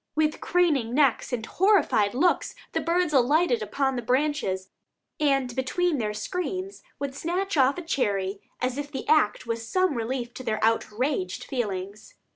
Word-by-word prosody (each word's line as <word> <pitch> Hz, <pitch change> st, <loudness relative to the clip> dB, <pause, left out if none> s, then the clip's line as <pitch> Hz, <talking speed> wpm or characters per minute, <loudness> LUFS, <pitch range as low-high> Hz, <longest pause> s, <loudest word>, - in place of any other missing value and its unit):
With 310 Hz, 0 st, +1 dB
craning 295 Hz, -10 st, +1 dB
necks 275 Hz, -4 st, +2 dB
and 235 Hz, -3 st, -2 dB
horrified 350 Hz, -, +3 dB
looks 350 Hz, +7 st, +1 dB, 0.2 s
the -, -, -1 dB
birds 340 Hz, -2 st, +1 dB
alighted 315 Hz, -, +3 dB
upon 270 Hz, -10 st, -1 dB
the 245 Hz, -, -2 dB
branches, 250 Hz, -7 st, 0 dB, 0.5 s
and 275 Hz, -5 st, +1 dB
between 300 Hz, +4 st, 0 dB
their 210 Hz, -2 st, -2 dB
screams 370 Hz, -, -4 dB, 0.2 s
would 280 Hz, -1 st, -4 dB
snatch 360 Hz, +6 st, -2 dB
off 270 Hz, +1 st, +4 dB
a 350 Hz, -, -5 dB
cherry, 200 Hz, -, -1 dB, 0.2 s
as 255 Hz, +2 st, -1 dB
if 290 Hz, 0 st, -5 dB
the 265 Hz, -, -5 dB
act 305 Hz, -7 st, +3 dB
was 230 Hz, -1 st, -3 dB
some 370 Hz, -3 st, +2 dB
relief 240 Hz, 0 st, -3 dB
to 255 Hz, -, -8 dB
their 215 Hz, -3 st, -1 dB
outraged 225 Hz, -2 st, 0 dB
feelings. 205 Hz, -5 st, -4 dB
265 Hz, 155 wpm, -26 LUFS, 230-320 Hz, 0.5 s, off